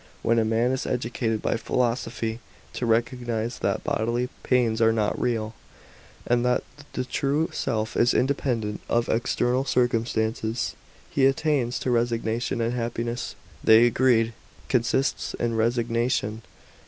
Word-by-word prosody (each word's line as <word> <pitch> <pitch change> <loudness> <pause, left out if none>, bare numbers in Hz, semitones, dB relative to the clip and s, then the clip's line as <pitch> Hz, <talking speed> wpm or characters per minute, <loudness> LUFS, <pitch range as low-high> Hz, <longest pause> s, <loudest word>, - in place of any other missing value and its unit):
When 115 0 +3
a - - +3
man 115 +3 +1
is 130 - -2
educated 115 -2 -1
by - - +1
philosophy 115 -1 -1 0.3
to 120 - -2
recognise 120 0 0
that - - -1
bodily 120 +3 0
pains 120 -3 +2
are 115 0 +5
not 110 -2 0
real, 115 -3 -1 0.7
and 120 0 +2
that 125 0 +2 0.3
the 130 - -2
true 140 +5 0
self 110 -3 -2
is 120 +1 +3
independent 125 -6 0
of 120 0 +1
external 125 +2 +1
circum 120 -3 +1
stances, 110 0 -1 0.4
he 135 -1 +4
attains 135 -3 +1
to 130 - 0
resignation; 115 0 0
and 115 +1 0
happiness, 120 0 -3 0.3
they 110 +2 +7
agreed, 120 -2 +3 0.4
consists 130 +2 0
in 115 -1 -1
resignation. 115 -1 0
120 Hz, 130 wpm, -25 LUFS, 115-125 Hz, 0.7 s, they